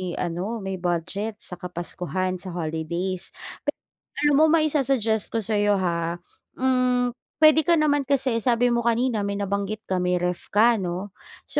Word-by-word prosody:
ano, 185 +6 -3
may 190 -1 -4
budget 180 +5 -2
sa 180 -2 -5
kapaskuhan, 180 +1 -3
sa 190 - -6
holidays. 170 +3 -3 0.3
Pe - - 0 0.5
alam 295 -1 +4
mo 315 - +6
maisa-suggest 275 -9 +2
ko 225 -1 0
sa'yo 205 0 +2
ha, 170 -2 -1 0.4
hmm, 250 -1 +2 0.3
puwede 310 0 +6
ka 340 - +5
naman 290 -3 +2
kasi 265 -4 +2
sabi 245 +1 +2
mo 240 - +2
kanina, 235 0 +1
may 200 - -2
nabanggit 200 +1 -2
ka, 185 -1 -1
may 180 0 +1
ref 180 0 -2
ka, 225 +2 +4
'no. 185 +2 -4 0.3
So - - -1
205 Hz, 155 wpm, -24 LUFS, 180-250 Hz, 0.5 s, mo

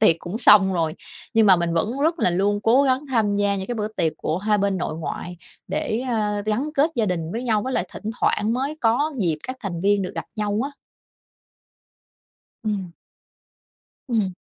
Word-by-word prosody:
tiệc 190 -7 +5
cũng 175 +6 -5
xong 205 -4 +6
rồi. 160 -2 0 0.4
Nhưng 220 -1 +5
mà 190 -2 +7
mình 170 -1 -1
vẫn 170 +6 +1 0.5
luôn 205 +1 +1
cố 250 +5 +5
gắng 265 +1 +1
tham 220 -5 +1
gia 200 -1 +1
những 190 - -4
cái 245 - -3
bữa 210 -1 -2
tiệc 165 -7 -1
của 160 - -2
hai 210 +1 +1
bên 200 -1 +1
nội 160 -2 -3
ngoại 175 +2 -5 0.3
để, 220 - -1
a, 210 -3 0
gắn 250 +8 0
kết 295 +4 +3
gia 220 -3 +2
đình 165 -2 -2
với 230 - -3
nhau, 220 -4 +1
với 260 - -3
lại 180 - -1
thỉnh 215 - -5
thoảng 215 +2 +2
mới 270 +5 -2
có 245 +7 +2
dịp 165 -7 0
các 255 0 -6
thành 180 -6 -4
viên 200 +1 +2
được 180 - -4
gặp - - -5
nhau 210 0 -1
á. 280 - -4 1.9
Ừm. 195 -5 -2 1.2
Ừm. 210 -6 0
210 Hz, 190 wpm, -23 LUFS, 185-230 Hz, 1.9 s, mà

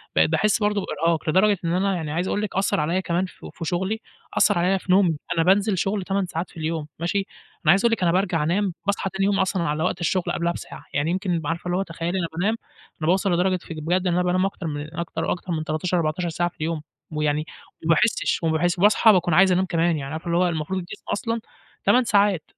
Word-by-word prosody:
بقيت 80 0 +4
باحس 210 - +2
برضه 210 -1 +1
بإرهاق، 165 -1 0
لدرجة 200 +5 +4
إن 165 - 0
أنا 195 +2 +1
يعني 160 -4 -4
عايز 175 +4 -1
أقول 205 - -1
لِك 210 - -4
أثّر 195 +1 +1
عليَّ 165 +5 0
كمان 175 0 0
ف 185 - -13
في 165 - -6
شغلي، 190 +7 -1 0.4
أثّر - - +4
عليَّ 185 +2 +2
في 185 - -3
نومي، 180 -4 +4 0.2
أنا 165 - +3
بانزل 195 +2 +3
شغل 195 +1 -1
8 195 +1 0
ساعات 170 0 -4
في - - -16
اليوم، 160 -1 -3
ماشي؟ 170 +4 -1 0.5
أنا 155 - +7
عايز 195 +2 +4
أقول 235 - +4
لِك 225 - -1
أنا 170 - +4
بارجع 175 -3 +1
أنام، 185 +4 0
باصحى 200 -1 0
تاني 190 +1 -1
يوم 200 -1 +2
أصلًا 190 -2 +1
على 155 -1 -1
وقت 180 - -1
الشغل 180 +2 +1
قبلَها 170 0 0
بساعة، - - -9
يعني 145 +4 +1
يمكن 180 -2 -1
عارفة 165 +3 -3
اللي 175 0 0
هو 195 - +1
تخيلي 170 +1 -3
أنا 170 - -1
بانام، 205 +6 +1 0.5
أنا 155 - -1
باوصل 190 +2 +2
لدرجة 185 +2 +2
ف - - -16
بجد 175 +4 -1
إن 175 - +2
أنا 180 +1 +2
بانام 180 +1 +2
أكتر 190 -3 -4
من 150 +1 -5
أكتر 170 - -3
وأكتر 180 0 -3
من 155 -1 -2
13 155 +4 -1
14 170 +2 -1
ساعة 175 +2 -1
في - - -31
اليوم، 160 0 -2 0.3
ويعني 150 0 0 0.4
ما - - -1
باحسش 215 0 +1
و 165 - +2
باحس 175 +3 +1
باصحى 210 +3 +6
باكون 175 -2 +2
عايز 190 +3 +6
أنام 185 +1 +2
كمان، 170 -2 +1
يعني 140 0 -5
عارفة 160 +2 -6
اللي 170 0 +1
هو 180 +1 +3
المفروض 165 +3 -2
الجسم 175 -1 -9
أصلًا 230 +2 -2 0.4
8 255 - +5
ساعات، 200 -6 +2
175 Hz, 240 wpm, -23 LUFS, 165-190 Hz, 0.5 s, أنا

